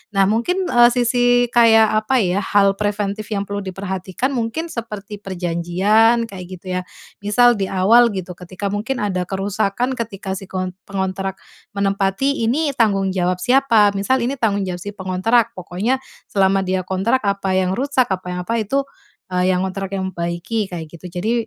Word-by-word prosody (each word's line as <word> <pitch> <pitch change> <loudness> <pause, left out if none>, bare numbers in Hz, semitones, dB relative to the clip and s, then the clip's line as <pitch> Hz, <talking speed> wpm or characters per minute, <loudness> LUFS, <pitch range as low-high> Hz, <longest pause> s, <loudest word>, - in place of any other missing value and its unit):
Nah 195 0 +5
mungkin, 355 - 0
eee, 240 0 +6
sisi 245 0 +3
kayak 225 -2 +5
apa 260 +3 +2
ya 185 0 +1
hal 200 0 +3
preventif 205 0 -2
yang 200 -2 -2
perlu 200 0 -4
diperhatikan 190 +6 -3
mungkin 240 +6 -2
seperti 210 -4 -6
perjanjian 190 +6 +2
kayak 185 -2 -8
gitu 185 +1 -4
ya. - - -4 0.4
Misal 240 +4 +5
di 195 - 0
awal 225 +6 +5
gitu, 185 -2 -5
ketika 185 +2 -8
mungkin 220 +6 -2
ada 185 -4 -1
kerusakan 200 +5 -1
ketika 200 -4 -4
si 195 - -9
kontr 185 -1 -3 0.2
pengontrak 190 0 -3 0.4
menempati 200 +7 0
ini 290 +4 +1
tanggung 195 -5 +2
jawab 180 -1 0
siapa? 240 -5 +4
Misal 235 +6 +1
ini 270 +3 -1
tanggung 205 -4 +1
jawab 180 -1 -4
si 205 - -5
pengontrak. 195 +4 +1
Pokoknya 195 +9 -1 0.3
selama 195 -1 +2
dia 185 0 -1
kontrak, 195 +7 +1
apa 200 -1 0
yang 185 0 0
rusak, 265 0 +1
apa 185 -1 -3
yang 180 - -4
apa 230 - 0
itu, 270 +6 0 0.5
e 180 - -3 0.2
yang 185 0 +1
ngontrak 195 0 -5
yang 190 -1 -2
membaiki, 175 +5 -3
kayak 165 -3 -5
gitu. 170 +2 -10
Jadi 200 +6 -1
200 Hz, 170 wpm, -20 LUFS, 185-230 Hz, 0.5 s, eee